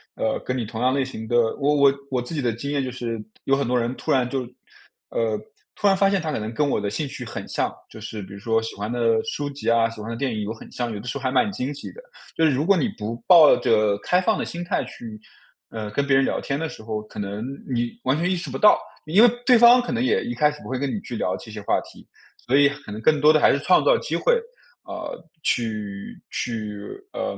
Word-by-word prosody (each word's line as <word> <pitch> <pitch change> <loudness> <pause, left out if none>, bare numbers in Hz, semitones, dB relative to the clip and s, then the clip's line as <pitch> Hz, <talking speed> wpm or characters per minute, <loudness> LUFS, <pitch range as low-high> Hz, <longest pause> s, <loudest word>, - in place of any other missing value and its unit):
呃， 110 - -1
跟 130 0 -2
你 120 - -2
同 110 +2 -6
样 130 +1 +3
类 135 0 +1
型 110 -4 -7
的 120 +1 +2 0.2
我 145 +1 +2
我 140 -1 +5 0.2
我 125 -2 0
自 125 - -7
己 150 - -1
的 120 -2 +1
经 140 +6 -5
验 140 -2 0
就 130 - -3
是 115 -3 -4 0.2
有 135 - +3
很 140 -2 -1
多 125 0 +2
人 120 +1 -1
突 - - -3
然 130 -2 +3
就 130 +1 -2 0.7
呃， 110 -2 0 0.4
突 205 - +1
然 195 - +5
发 195 0 +4
现 195 -3 +1
他 155 - -3
可 - - -2
能 110 +2 -5
跟 145 +5 +1
我 - - +1
的 100 - -2
兴 145 +9 -2
趣 - - -7
很 - - -6
像， - - -1 0.2
就 - - -11
是 105 -2 -6
比 95 - -10
如 100 - -9
说 115 +2 +1
喜 115 - -6
欢 105 +1 -4
的 115 -2 +2
书 145 +5 -3
籍 140 -4 -3
啊， 115 0 +3
喜 115 -1 -11
欢 110 - -6
的 115 - -3
电 130 0 -2
影 110 - -3
有 105 +2 -3
很 115 - -13
像， 120 -1 -3
有 105 - -5
的 - - -13
时 120 - -2
候 140 - -8
还 130 - 0
蛮 130 +10 +2
惊 140 -7 -3
喜 145 - -8
的。 - - -13 0.3
就 165 - +3
是 155 - +4
如 140 +3 0
果 195 +1 +4
你 155 - +1
不 110 +2 -4
抱 165 -5 +8
着 105 -2 +2
开 180 +1 +2
放 215 +2 +1
的 - - -1
心 170 +1 -5
态 180 +3 -1
去， 110 -2 -9 0.5
呃， 110 -2 -5
跟 140 +5 -1
别 135 - +4
人 135 - +4
聊 - - 0
天 140 - -2
的 160 0 -3
时 - - -10
候， 110 -1 -4
可 105 0 -10
能 100 +2 -4 0.3
你 120 -1 0
完 130 +3 +1
全 175 +3 0
意 185 - +2
识 170 - -5
不 - - -4
到， 210 - +6 0.3
因 175 +8 +4
为 240 - +8 0.2
对 250 -2 +7
方 240 +2 +8
可 245 - -5
能 240 0 -1
也 - - +2
一 120 - -3
开 150 +5 +3
始 150 - -11
不 - - -9
会 130 - -2
跟 140 0 -1
你 - - -1
去 120 - -7
聊 90 - -1
这 110 - -11
些 105 - -7
话 - - +1
题， - - -15 0.3
所 130 - -1
以 140 0 +6
可 140 -5 -10
能 105 +1 -6
更 155 +5 +3
多 155 +2 +6
的 155 - +4
还 - - +5
是 140 - +1
创 180 - +4
造 - - +5
机 - - -3
会， - - +3 0.5
呃， - - -6 0.2
去 105 -4 -2
去， 110 -3 -4 0.3
呃， - - -3
130 Hz, 300 characters per minute, -23 LUFS, 110-150 Hz, 0.7 s, 抱